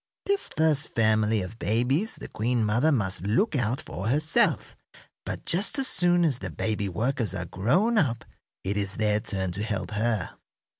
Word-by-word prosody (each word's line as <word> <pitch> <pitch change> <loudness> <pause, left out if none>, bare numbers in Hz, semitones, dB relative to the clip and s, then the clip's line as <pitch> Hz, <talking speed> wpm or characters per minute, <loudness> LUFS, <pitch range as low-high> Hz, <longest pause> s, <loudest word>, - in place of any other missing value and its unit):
This 400 -1 +1
first 155 -2 +2
family 110 -2 +2
of 105 +6 -9
babies 130 - +1
the - - -9
queen 115 +1 0
mother 120 +9 +2
must 95 - 0
look 170 - +1
out 125 0 0
for 95 +4 -5
herself, 150 +6 +2 0.5
but - - -5
just 190 - +1
as 270 - +1
soon 175 -5 +2
as 135 -6 +1
the 95 - -5
baby 100 +5 -2
workers 115 +1 -1
are 90 -2 -3
grown 180 - +2
up 120 - 0 0.4
it 100 +2 -2
is 100 0 -2
their 105 -1 +1
turn 95 -4 -2
to 95 +4 -5
help 105 -2 -3
her. 105 -3 -1
115 Hz, 170 wpm, -26 LUFS, 105-150 Hz, 0.5 s, first